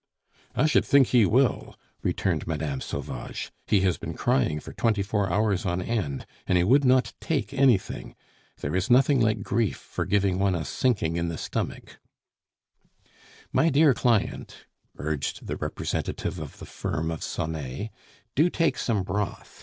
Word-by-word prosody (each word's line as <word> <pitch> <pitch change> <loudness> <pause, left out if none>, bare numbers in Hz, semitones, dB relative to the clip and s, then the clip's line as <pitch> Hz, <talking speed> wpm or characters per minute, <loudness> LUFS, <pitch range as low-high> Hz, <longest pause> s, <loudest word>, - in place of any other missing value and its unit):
"I 125 - +3
should 155 - +4
think 140 -3 +4
he 120 -5 +5
will!" 130 +2 +1 0.3
returned - - -1
Mme. 75 -4 -2
Sauvage. 70 - -5 0.2
"He 100 - +3
has 95 -2 +1
been - - -5
crying 75 +4 +1
for - - -10
twenty 110 -4 +1
four 100 -2 0
hours 105 0 +1
on 90 -2 -1
end, 90 - -2 0.2
and 90 - +3
he 85 - +3
would 135 +9 +4
not 130 0 +3
take 145 -3 -1
anything. 130 -7 +1 0.5
There 70 +4 -2
is 95 +1 0
nothing 130 +1 +5
like 110 -2 +1
grief 115 -5 0
for - - -5
giving 100 -2 +1
one 95 -2 +2
a 80 -3 -3
sinking 85 - 0
in 85 0 0
the 85 -1 -4
stomach." - - -4 1.5
"My 165 - +4
dear 145 0 +5
client," 115 -4 0 0.3
urged 75 -2 -3
the - - -3
representative - - -3
of - - -8
the - - -9
firm 80 +2 -3
of 80 - -5
Sonet, 80 - -4 0.4
"do 155 +6 +4
take 165 -2 +1
some 105 -6 0
broth. 100 +2 -4
100 Hz, 160 wpm, -26 LUFS, 85-125 Hz, 1.5 s, he